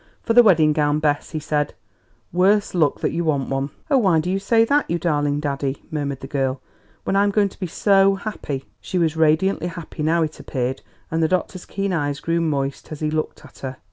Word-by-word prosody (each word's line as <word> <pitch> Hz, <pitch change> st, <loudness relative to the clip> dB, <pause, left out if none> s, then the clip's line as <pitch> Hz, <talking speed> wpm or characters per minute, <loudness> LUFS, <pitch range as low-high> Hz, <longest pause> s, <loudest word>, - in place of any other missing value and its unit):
"For 230 Hz, -, +1 dB
the 245 Hz, -, +9 dB
wedding 160 Hz, -9 st, +5 dB
gown, 150 Hz, -1 st, +2 dB
Bess," 145 Hz, -1 st, 0 dB
he 155 Hz, -, -4 dB
said; 150 Hz, -1 st, -1 dB, 0.6 s
"worse 195 Hz, +3 st, +3 dB
luck 160 Hz, -5 st, +1 dB
that -, -, 0 dB
you 170 Hz, -, -1 dB
want 145 Hz, -5 st, 0 dB
one!" 135 Hz, +1 st, -1 dB, 0.2 s
"Oh, 275 Hz, -, +5 dB
why 185 Hz, -8 st, +3 dB
do 180 Hz, +3 st, -2 dB
you 195 Hz, -, 0 dB
say 225 Hz, +3 st, +3 dB
that, 290 Hz, +4 st, +1 dB
you 170 Hz, -, +1 dB
darling 145 Hz, -3 st, 0 dB
daddy?" 140 Hz, -2 st, -3 dB
murmured 140 Hz, -3 st, -3 dB
the 135 Hz, -, -7 dB
girl, 135 Hz, -1 st, -1 dB, 0.4 s
"when -, -, -1 dB
I'm 200 Hz, +1 st, +4 dB
going 200 Hz, 0 st, +2 dB
to -, -, -19 dB
be 185 Hz, -, -2 dB
so 195 Hz, +3 st, +3 dB
happy!" 190 Hz, -10 st, -5 dB
She 185 Hz, -, -4 dB
was 165 Hz, -3 st, +1 dB
radiantly 160 Hz, +4 st, +2 dB
happy 170 Hz, -3 st, -7 dB
now, 165 Hz, +2 st, +2 dB
it 155 Hz, -1 st, -5 dB
appeared, 130 Hz, 0 st, -3 dB, 0.3 s
and 165 Hz, 0 st, 0 dB
the 160 Hz, -, +3 dB
doctor's 185 Hz, +1 st, -2 dB
keen 195 Hz, -1 st, -2 dB
eyes 145 Hz, -3 st, -1 dB
grew 170 Hz, 0 st, 0 dB
moist 140 Hz, -4 st, -2 dB
as 155 Hz, -, -7 dB
he 155 Hz, 0 st, 0 dB
looked 155 Hz, 0 st, -3 dB
at -, -, -16 dB
her. 130 Hz, -1 st, -6 dB
160 Hz, 220 wpm, -22 LUFS, 145-190 Hz, 0.6 s, the